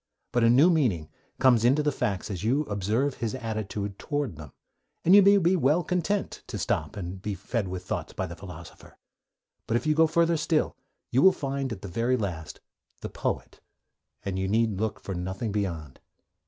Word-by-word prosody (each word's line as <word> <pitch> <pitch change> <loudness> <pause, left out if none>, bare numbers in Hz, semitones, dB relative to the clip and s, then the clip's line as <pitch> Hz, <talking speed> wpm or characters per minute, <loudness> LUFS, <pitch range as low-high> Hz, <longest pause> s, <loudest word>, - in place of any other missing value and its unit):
But 120 - +2
a 115 - +6
new 140 +9 +6
meaning 110 - +1 0.3
comes 125 -4 +4
into 135 +5 +4
the 150 - +2
facts 105 -5 -2
as 95 -1 -5
you 130 +7 +2
observe 110 +5 -1
his 115 +1 -2
attitude 105 -4 -4
towards 145 - -2
them, 75 -3 -10 0.5
and 175 - +6
you 205 - +9
may 200 +1 +6
be 180 0 +3
well 155 +2 +2
content 180 +3 -1
to - - -5
stop 110 - -2
and 95 0 -6
be 105 0 -3
fed 100 +2 -3
with 90 0 -6
thoughts - - -3
by - - -3
the 85 - -7
philosopher. 85 -2 -12 0.7
But 115 - +2
if - - -5
you 155 - +3
go 160 +1 +5
further 170 +1 +2
still 155 0 0 0.4
you 130 - +3
will 190 - +8
find, 135 -4 -3
at 100 -4 -6
the - - -5
very 115 +7 0
last, 90 -8 -5 0.4
the - - -5
poet, - - -4 0.7
and 95 -1 -2
you 95 - -1
need 110 -1 +1
look 110 -1 -2
for 95 - -6
nothing 95 +5 -3
beyond. 85 -9 -3
115 Hz, 195 wpm, -27 LUFS, 95-145 Hz, 0.7 s, you